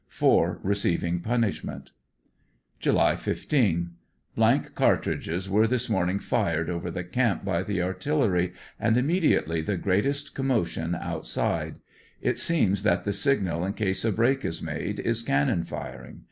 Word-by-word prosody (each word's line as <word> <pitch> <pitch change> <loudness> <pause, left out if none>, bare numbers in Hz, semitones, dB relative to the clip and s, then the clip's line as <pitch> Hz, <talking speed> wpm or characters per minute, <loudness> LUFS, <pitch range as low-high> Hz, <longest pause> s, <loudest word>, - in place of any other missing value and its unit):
Four - - +2
receiving 90 -3 0
punishment. 115 +3 -2 0.9
July - - +3
15. 85 - 0 0.2
— - - -43
Blank - - +2
cartridges 90 +4 0
were 105 +3 +3
this 125 0 -1
morning 95 -2 +1
fired 95 - 0
over 85 0 -3
the 90 +1 -4
camp 105 +2 0
by 95 -4 0
the 100 -4 -1
artillery, 95 -3 0 0.3
and 110 +1 +2
immediately 130 - +2
the 95 +4 -2
greatest 120 +11 0
commotion 90 -11 -1
out - - -5
side. - - -1 0.4
It - - 0
seems 105 - +2
that 90 -3 +2
the 100 - -1
signal 100 - +1
in 95 +2 -1
case 95 -3 -1
a 110 - +2
break 125 +6 +2
is 80 - -2
made, - - -4
is 115 0 0
cannon 85 -3 +1
firing. 60 -6 -8
100 Hz, 145 wpm, -26 LUFS, 85-115 Hz, 0.9 s, July